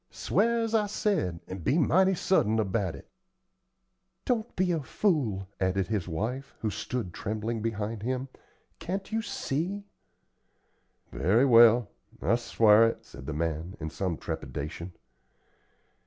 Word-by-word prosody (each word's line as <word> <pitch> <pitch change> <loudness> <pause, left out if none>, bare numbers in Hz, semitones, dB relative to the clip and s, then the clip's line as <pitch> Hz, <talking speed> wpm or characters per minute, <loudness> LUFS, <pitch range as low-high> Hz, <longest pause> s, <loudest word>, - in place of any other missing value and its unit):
Sw'ar, 235 0 +1
as 225 0 -3
I 215 -2 +3
said, 150 - -1
and 95 -2 -7
be 140 - +2
mighty 190 +4 +4
sudden 110 - +2
about 100 -4 0
it." - - -13 1.2
"Don't 235 -2 -1
be 185 -1 +1
a 165 -3 0
fool," 130 - 0
added 95 0 +1
his 105 -6 -1
wife, 115 +11 -4
who 110 - -1
stood 110 -2 -4
trembling 110 +4 -3
behind 110 -1 -3
him. 130 +3 -2 0.5
"Can't 190 +5 -4
you 225 +1 0
see?" 200 -1 -3 1.3
"Very 95 - +3
well, 120 -2 +7 0.3
I - - +1
sw'ar 115 -2 +5
it," 115 - -4
said 70 -1 -12
the 80 - -3
man, 80 +3 -3
in 80 -1 -5
some 90 -3 -2
trepidation. 85 +5 -5
115 Hz, 135 wpm, -28 LUFS, -, 1.3 s, well